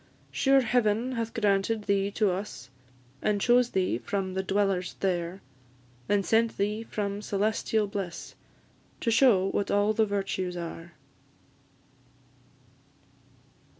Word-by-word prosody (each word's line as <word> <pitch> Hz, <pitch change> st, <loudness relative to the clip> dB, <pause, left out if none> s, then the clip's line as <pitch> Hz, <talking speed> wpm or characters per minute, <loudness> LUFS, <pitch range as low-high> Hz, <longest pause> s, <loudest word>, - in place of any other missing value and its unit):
Sure 270 Hz, 0 st, +4 dB
Heaven 235 Hz, 0 st, +1 dB
hath 230 Hz, -2 st, -3 dB
granted 210 Hz, 0 st, +1 dB
thee 200 Hz, -1 st, +1 dB
to 205 Hz, -1 st, +1 dB
us, 180 Hz, -, -6 dB, 0.5 s
And 210 Hz, -1 st, +1 dB
chose 245 Hz, +3 st, +4 dB
thee 185 Hz, -, 0 dB
from 190 Hz, +2 st, -3 dB
the 190 Hz, -, -1 dB
dwellers 190 Hz, -1 st, 0 dB
there; 180 Hz, -1 st, -2 dB, 0.7 s
And 205 Hz, -2 st, +2 dB
sent 225 Hz, 0 st, +2 dB
thee 210 Hz, +2 st, -1 dB
from 205 Hz, -2 st, -4 dB
celestial 215 Hz, +1 st, 0 dB
bliss, 195 Hz, -4 st, -6 dB, 0.7 s
To 230 Hz, -, +1 dB
shew 225 Hz, -5 st, +4 dB
what 200 Hz, -, -1 dB
all 205 Hz, +1 st, +2 dB
the 220 Hz, 0 st, +2 dB
virtues 195 Hz, -3 st, -2 dB
are. 170 Hz, 0 st, -7 dB
205 Hz, 115 wpm, -28 LUFS, 190-220 Hz, 0.7 s, Sure